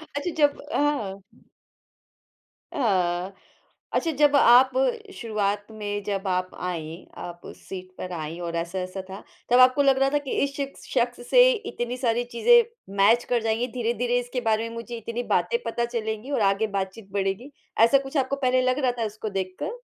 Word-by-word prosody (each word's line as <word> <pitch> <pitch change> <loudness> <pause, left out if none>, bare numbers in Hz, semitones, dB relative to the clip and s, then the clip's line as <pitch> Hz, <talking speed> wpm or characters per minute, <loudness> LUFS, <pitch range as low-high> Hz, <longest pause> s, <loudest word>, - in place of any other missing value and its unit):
अच्छा, 285 +5 -2
जब 290 -1 +3
अ 220 -10 -3 1.3
हाँ 180 -6 +1
अ, - - -19 0.6
अच्छा, 330 - +1
जब 290 -1 +3
आप 255 -1 +7 0.4
शुरुआत 210 - -2
में 205 -1 -4
जब 200 -1 -3
आप 185 0 0
आई, 170 -1 -5
आप 175 0 -8
उस - - -10
सीट 185 -1 -7
पर 185 - -6
आई 160 0 -5
और 170 -1 -4
ऐसा-ऐसा 185 +3 -3
था, 190 +2 -8 0.3
तब 245 +1 +5
आपको 255 +3 +6
लग 270 -1 +4
रहा 270 0 +3
था 290 - +1
कि - - -3
इस 280 0 -1
शिख 275 -1 -4
शख्स 240 -1 -1
से - - +7
इतनी 255 - -4
सारी 240 -2 +1
चीज़ें 470 - +5 0.3
मैच 220 +5 +5
कर 240 -1 +2
जाएँगी, 225 +2 0
धीरे-धीरे 240 0 0
इसके 245 +1 -4
बारे 225 0 0
में 230 - -9
मुझे 235 +1 -6
इतनी 230 +2 -4
बातें 470 - +2
पता 235 - -1
चलेंगी 225 +2 -4
और 270 - 0
आगे 200 +2 +2
बातचीत 195 +2 -6
बढ़ेगी? 195 +7 -2 0.3
ऐसा 235 +5 +6
कुछ 275 +2 -4
आपको 270 0 +1
पहले 255 -2 +2
लग 255 +2 +1
रहा 260 -3 +2
था 225 - 0
उसको 215 +1 -5
देखकर? 195 - -4
230 Hz, 180 wpm, -25 LUFS, 195-260 Hz, 1.3 s, आप